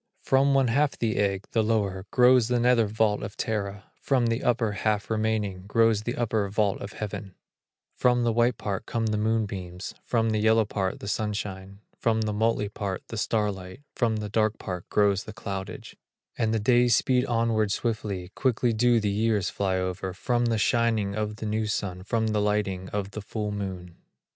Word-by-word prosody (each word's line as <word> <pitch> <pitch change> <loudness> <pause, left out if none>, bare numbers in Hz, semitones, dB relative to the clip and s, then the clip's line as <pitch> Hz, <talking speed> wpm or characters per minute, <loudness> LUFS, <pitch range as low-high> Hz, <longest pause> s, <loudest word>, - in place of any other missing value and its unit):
From 135 +1 +3
one 135 -3 +3
half 140 +4 +1
the 115 -2 -1
egg, 100 -1 0
the 115 - +2
lower, 100 -3 0
Grows 125 -2 +5
the 125 0 +1
nether 120 -2 +4
vault 105 0 +1
of 100 - -7
Terra: 100 -2 -3
From 130 -4 +2
the 115 +1 0
upper 115 -3 +1
half 105 +1 -1
remaining, 105 -4 -1
Grows 115 0 +3
the 120 +3 -3
upper 110 -4 0
vault 100 0 0
of 100 - -7
Heaven; 100 -3 -6 0.6
From 125 -1 +2
the 115 -1 +2
white 120 0 +2
part 100 0 -4
come 115 -1 -1
the 105 -1 0
moonbeams, 100 -5 -2
From 115 -2 +1
the 110 - +1
yellow 110 +1 +4
part 95 -2 -2
the - - -6
sunshine, 100 -2 -4 0.2
From 110 -1 +1
the 110 -1 -1
motley 110 0 +1
part 100 -2 -4
the 115 - -5
starlight, 105 +1 -2
From 115 -3 +1
the 105 -1 -4
dark 110 0 +1
part 90 -2 -6
grows 100 -1 +2
the 110 - -8
cloudage; 95 -3 -6 0.4
And 110 -2 0
the 110 - +1
days 120 +1 +4
speed 125 -2 +2
onward 115 -3 +1
swiftly, 100 -5 -2
Quickly 120 +1 +1
do 120 +1 +3
the 105 -2 0
years 105 -2 +1
fly 95 -2 0
over, 95 0 -3
From 120 +5 0
the 115 -1 +1
shining 110 -2 +1
of 105 0 -2
the 110 - -6
new 110 0 -1
sun 95 -3 -3
From 110 +3 0
the 105 -1 +1
lighting 100 -3 -1
of 100 -1 -3
the 110 - -6
full 105 0 -4
moon. 95 -4 -6
110 Hz, 185 wpm, -26 LUFS, 100-115 Hz, 0.6 s, Grows